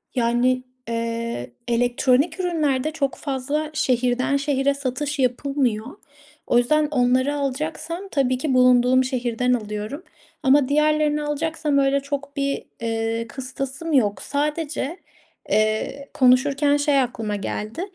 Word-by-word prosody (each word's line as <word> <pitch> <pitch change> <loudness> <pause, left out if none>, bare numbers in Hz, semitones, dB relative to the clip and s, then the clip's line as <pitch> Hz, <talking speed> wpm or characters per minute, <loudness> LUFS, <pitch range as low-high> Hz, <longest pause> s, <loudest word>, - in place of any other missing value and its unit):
Yani, 250 +1 +2 0.3
eee, 230 - -3 0.2
elektronik 250 +6 +2
ürünlerde 310 -6 0
çok 285 -4 -1
fazla 285 +2 -2
şehirden 255 -2 +1
şehre 280 -1 +1
satış 280 +2 -3
yapılmıyor. 255 -3 0 0.6
O - - +3
yüzden 300 +5 +3
onları 260 +1 +2
alacaksam 310 +6 -3
tabii 255 -3 +1
ki 280 0 -1
bulunduğum 250 0 +5
şehirden 250 -1 0
alıyorum 215 +6 -4 0.4
ama 270 0 +4
diğerlerini 300 0 +2
alacaksam 300 0 -1
öyle 275 0 +3
çok 285 0 -5
bir, 275 0 -1 0.2
ııı, 225 0 -1
kıstasım 270 +5 -5
yok. 210 -7 +2
Sadece, 300 +2 -2 0.5
eee, 215 +6 0
konuşurken 280 +3 +4
şey 285 -1 +2
aklıma 225 -4 -3
geldi. 210 - -4
270 Hz, 115 wpm, -23 LUFS, 245-290 Hz, 0.6 s, bulunduğum